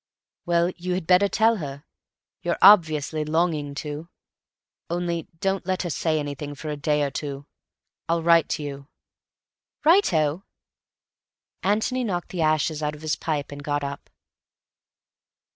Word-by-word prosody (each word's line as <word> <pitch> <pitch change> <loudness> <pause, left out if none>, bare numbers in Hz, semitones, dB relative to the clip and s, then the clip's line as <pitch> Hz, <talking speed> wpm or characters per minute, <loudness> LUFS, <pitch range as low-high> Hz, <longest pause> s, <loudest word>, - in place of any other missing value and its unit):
"Well, 170 +1 +2
you 180 +1 -2
had 185 -2 -3
better 185 +3 +5
tell 220 +3 +3
her. 140 -4 -6 0.6
You're 170 0 -1
obviously 160 -6 +5
longing 155 -2 0
to. 150 +3 -6 0.8
Only 170 -1 -2
don't 195 0 -1
let 185 0 0
her 175 - -3
say 155 +1 0
anything 145 0 -4
for 155 +2 -7
a - - -2
day 150 0 +1
or 140 - -1
two. 140 -1 -5 0.6
I'll 165 0 +1
write 165 -2 +5
to 150 - -6
you." 140 -1 -7 1.0
"Righto!" 180 - +3 1.2
Antony 220 +6 +1
knocked 180 -6 -3
the 180 - -3
ashes 155 0 +1
out 150 0 -2
of 150 - -14
his 155 - 0
pipe 150 -3 -3
and 145 0 -7
got 145 0 -1
up. 140 0 -6
160 Hz, 145 wpm, -24 LUFS, 145-180 Hz, 1.2 s, better